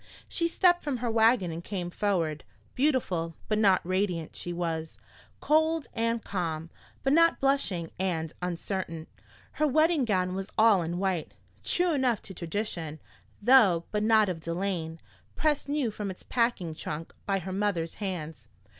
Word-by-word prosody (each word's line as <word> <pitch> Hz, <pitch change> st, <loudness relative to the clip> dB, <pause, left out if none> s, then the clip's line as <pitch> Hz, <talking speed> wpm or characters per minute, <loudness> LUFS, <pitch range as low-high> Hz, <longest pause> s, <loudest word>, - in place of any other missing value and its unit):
She 335 Hz, -, 0 dB
stepped 350 Hz, +1 st, +3 dB
from 285 Hz, -4 st, -2 dB
her 240 Hz, -1 st, -2 dB
wagon 225 Hz, -5 st, +4 dB
and 165 Hz, +1 st, -6 dB
came 180 Hz, -3 st, -4 dB
forward. 170 Hz, -7 st, 0 dB, 0.3 s
Beautiful, 190 Hz, -, 0 dB
but 215 Hz, -1 st, +1 dB
not 195 Hz, -5 st, +4 dB
radiant, 185 Hz, -4 st, -1 dB
she 175 Hz, -, -4 dB
was; 165 Hz, -2 st, -3 dB, 0.4 s
cold 315 Hz, 0 st, +2 dB
and 230 Hz, 0 st, 0 dB
calm, 165 Hz, -4 st, -3 dB, 0.3 s
but 270 Hz, -, +3 dB
not 335 Hz, +1 st, +5 dB
blushing 240 Hz, -12 st, 0 dB
and 165 Hz, -4 st, -1 dB
uncertain. 175 Hz, -2 st, -3 dB, 0.5 s
Her 305 Hz, -, +1 dB
wedding 310 Hz, +1 st, +3 dB
gown 185 Hz, -4 st, +1 dB
was 195 Hz, +1 st, -4 dB
all 215 Hz, -4 st, +6 dB
in 170 Hz, +1 st, -3 dB
white, 185 Hz, -4 st, -1 dB, 0.3 s
true 355 Hz, -1 st, +1 dB
enough 255 Hz, -6 st, +2 dB
to 190 Hz, -, -9 dB
tradition, 170 Hz, -3 st, -4 dB, 0.4 s
though 205 Hz, -9 st, +6 dB
but 210 Hz, -, 0 dB, 0.3 s
of 180 Hz, -3 st, -3 dB
delaine, 170 Hz, -1 st, -3 dB, 0.4 s
pressed 300 Hz, -2 st, 0 dB
new 285 Hz, -6 st, 0 dB
from 210 Hz, -1 st, -4 dB
its 185 Hz, -, -8 dB
packing 230 Hz, -9 st, 0 dB
trunk 155 Hz, +1 st, -6 dB
by 195 Hz, -1 st, +2 dB
her 190 Hz, 0 st, -5 dB
mother's 190 Hz, -5 st, -1 dB
hands. 170 Hz, -6 st, -5 dB
190 Hz, 150 wpm, -28 LUFS, 170-245 Hz, 0.5 s, all